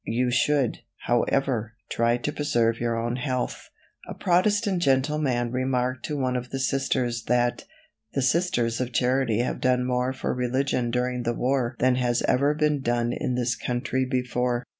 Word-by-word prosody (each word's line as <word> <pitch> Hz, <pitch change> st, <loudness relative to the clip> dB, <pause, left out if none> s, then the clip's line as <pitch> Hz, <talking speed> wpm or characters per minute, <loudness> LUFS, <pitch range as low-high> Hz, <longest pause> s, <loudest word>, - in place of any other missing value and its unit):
You 125 Hz, +2 st, +1 dB
should, 135 Hz, 0 st, +1 dB, 0.3 s
however, 120 Hz, -2 st, +1 dB, 0.2 s
try 115 Hz, +1 st, +2 dB
to 135 Hz, +4 st, -3 dB
preserve 115 Hz, -6 st, +1 dB
your 115 Hz, -1 st, -1 dB
own 120 Hz, +1 st, -2 dB
health." 130 Hz, -1 st, -3 dB, 0.4 s
A -, -, -6 dB
Protestant 195 Hz, +1 st, +2 dB
gentleman 135 Hz, -3 st, +1 dB
remarked 130 Hz, 0 st, -1 dB
to 150 Hz, -, -3 dB
one 130 Hz, -2 st, 0 dB
of 125 Hz, 0 st, -3 dB
the 135 Hz, -, -3 dB
Sisters 130 Hz, -3 st, -1 dB
that 120 Hz, 0 st, +1 dB, 0.5 s
"the 135 Hz, -, +1 dB
Sisters 130 Hz, -6 st, +1 dB
of 125 Hz, -1 st, -3 dB
Charity 125 Hz, -2 st, +2 dB
have 125 Hz, -, -3 dB
done 125 Hz, -1 st, +2 dB
more 125 Hz, 0 st, 0 dB
for 130 Hz, -, -3 dB
religion 125 Hz, 0 st, 0 dB
during 125 Hz, +1 st, -1 dB
the 120 Hz, 0 st, -1 dB
war 125 Hz, -1 st, 0 dB
than 125 Hz, 0 st, +2 dB
has 120 Hz, -1 st, +1 dB
ever 140 Hz, +3 st, +2 dB
been 150 Hz, -2 st, +1 dB
done 120 Hz, -1 st, 0 dB
in 125 Hz, -, -2 dB
this 120 Hz, -1 st, 0 dB
country 125 Hz, +1 st, -1 dB
before." 125 Hz, -1 st, -1 dB
125 Hz, 160 wpm, -25 LUFS, 120-135 Hz, 0.5 s, try